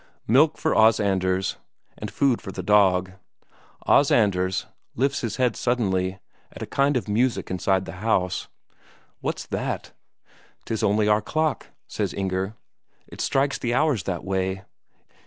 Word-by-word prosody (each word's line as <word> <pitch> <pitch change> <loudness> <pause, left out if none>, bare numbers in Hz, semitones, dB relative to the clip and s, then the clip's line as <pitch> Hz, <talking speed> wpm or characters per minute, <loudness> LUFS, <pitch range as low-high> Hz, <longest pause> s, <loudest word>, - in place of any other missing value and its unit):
Milk 150 +7 +4
for 160 - 0
Os 110 +1 +5
Anders, 95 -2 0 0.4
and - - -6
food 135 -4 +1
for 95 - -7
the - - -6
dog. 95 -3 +3 0.7
Os 140 - +5
Anders 95 -4 +2 0.3
lifts 135 +3 0
his 115 -4 -3
head 125 -3 +1
suddenly, 95 -6 0 0.3
at - - -8
a - - -3
kind 140 0 +1
of 120 - -4
music 115 +2 0
inside 95 +1 +1
the - - -7
house. 95 -5 0 0.7
"What's - - -3
that?" - - -4 0.7
"'Tis 110 - -2
only 105 +1 +2
our 105 0 +3
clock," 155 +7 -1 0.2
says - - -3
Inger. 95 +2 -2 0.5
"It - - -8
strikes 135 +1 +1
the 120 0 -1
hours 145 -7 +2
that 90 -3 -3
way." 95 0 -2
105 Hz, 145 wpm, -24 LUFS, 95-125 Hz, 0.7 s, Os